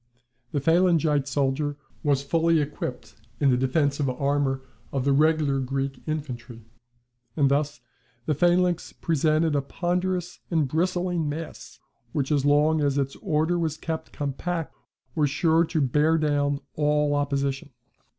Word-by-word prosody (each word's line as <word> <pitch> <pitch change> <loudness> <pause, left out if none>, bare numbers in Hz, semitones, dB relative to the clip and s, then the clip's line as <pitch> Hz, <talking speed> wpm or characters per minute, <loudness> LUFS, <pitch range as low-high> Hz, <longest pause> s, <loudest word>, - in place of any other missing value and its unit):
The 145 - 0
phalangite 160 -3 +3
soldier 140 +2 0 0.2
was 140 -2 +1
fully 165 +2 +2
equipped 125 -6 -4 0.3
in 140 -2 +4
the - - +4
defensive 140 +2 +1
armour 135 0 0 0.3
of 135 -2 -1
the 140 - +3
regular 150 -1 +3
Greek 135 0 -3
infantry. 125 -7 -5 0.7
And 140 -2 +3
thus 145 -2 0 0.4
the 155 - +1
phalanx 175 +3 +2
presented 155 0 +1
a 140 - +2
ponderous 180 +4 -2
and 160 -5 +1
bristling 175 +1 0
mass, 155 +2 -7 0.4
which 140 -1 -1
as 145 -2 +2
long 150 +2 +4
as 140 -1 +1
its 135 -1 -1
order 160 +3 0
was 160 -2 -1
kept 160 -1 -5
compact, 160 +4 -3 0.4
was 150 -3 +2
sure 160 +4 +3
to 160 0 -1
bear 150 +5 +3
down 145 -2 +1
all 150 -1 +2
opposition. 140 -1 -1
145 Hz, 135 wpm, -25 LUFS, 140-160 Hz, 0.7 s, in